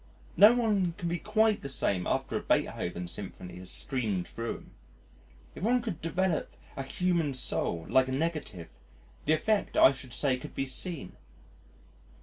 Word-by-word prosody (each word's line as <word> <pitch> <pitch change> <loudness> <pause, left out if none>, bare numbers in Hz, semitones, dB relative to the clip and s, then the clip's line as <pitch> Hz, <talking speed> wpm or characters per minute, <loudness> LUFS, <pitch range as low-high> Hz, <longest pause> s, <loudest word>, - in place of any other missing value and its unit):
No 215 +4 +8
one 205 -7 +1
can 180 -4 -3
be 175 0 -1
quite 215 0 +2
the 140 - -5
same 100 -8 0
after - - -1
a - - +1
Beethoven 90 0 -1
Symphony 90 -1 -7
has 90 0 -6
streamed 105 -10 -1
thro' 115 0 -4
him. - - -13 0.8
If - - -10
one 245 +2 +3
could 215 -10 -4
develop 175 +1 -1 0.2
a - - -3
human 165 0 0
soul 85 -9 -1
like 130 0 +4
a - - -3
negative 140 - -3 0.6
the 155 - +4
effect 210 +6 +1
I - - +8
should 130 -2 -9
say 135 -3 +2
could - - -10
be 135 - -1
seen.... 135 - -4
145 Hz, 160 wpm, -30 LUFS, 115-185 Hz, 0.8 s, No